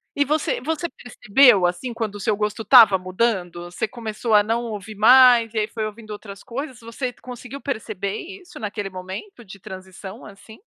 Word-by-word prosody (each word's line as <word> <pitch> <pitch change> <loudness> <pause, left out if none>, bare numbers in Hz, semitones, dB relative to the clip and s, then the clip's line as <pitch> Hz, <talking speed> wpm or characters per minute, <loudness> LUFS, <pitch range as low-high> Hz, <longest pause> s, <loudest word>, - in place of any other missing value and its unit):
E 285 -1 +2
você 305 +1 0
você 320 +5 -3
percebeu, 240 -3 +3
assim, 180 +8 -2
quando 220 -3 -4
o 205 - -9
seu 210 0 0
gosto 210 +1 -2
estava 215 -4 +7
mudando? 185 -3 -2
Você 215 +5 -3
começou 225 -1 -3
a 205 - +7
não 230 +3 -1
ouvir 215 -1 -7
mais 235 +1 +6
e - - -1
aí 210 - 0
foi 220 -1 -4
ouvindo 215 0 -10
outras 205 -1 -9
coisas? 260 0 -7
Você 235 +2 -5
conseguiu 250 +3 -10
perceber 215 -6 -4
isso 365 -3 -11
naquele 205 -2 -5
momento 190 - -8
de 200 -1 -13
transição, 190 +2 -10
assim? 205 +2 -14
220 Hz, 180 wpm, -22 LUFS, 200-245 Hz, -, estava